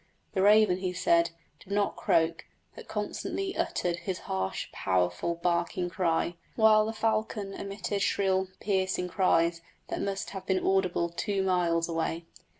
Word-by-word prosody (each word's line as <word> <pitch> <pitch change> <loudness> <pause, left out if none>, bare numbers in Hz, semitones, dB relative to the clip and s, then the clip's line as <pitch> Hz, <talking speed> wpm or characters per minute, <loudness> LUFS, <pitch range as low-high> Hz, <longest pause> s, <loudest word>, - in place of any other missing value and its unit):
The 190 - +1
raven, 205 -2 +5
he 185 -1 -2
said, 170 -1 +3 0.3
did 195 - -15
not 205 0 +1
croak, 165 -1 +1 0.3
but - - -11
constantly 390 -1 -3
uttered 175 -1 -1
his 185 +1 -4
harsh, 95 0 -2
powerful, 95 - 0
barking 175 +1 -1
cry, 170 -1 0 0.2
while 215 -1 +5
the - - -1
falcon 215 -2 -1
emitted 200 0 -4
shrill, 190 -1 +1
piercing 190 -2 0
cries 170 -3 +2 0.3
that - - -3
must 195 -1 -3
have 190 -1 -7
been 190 -1 +1
audible 185 -3 +2
two 195 +3 -1
miles 175 -3 +1
away. 165 0 -2
185 Hz, 145 wpm, -29 LUFS, 170-200 Hz, 0.3 s, raven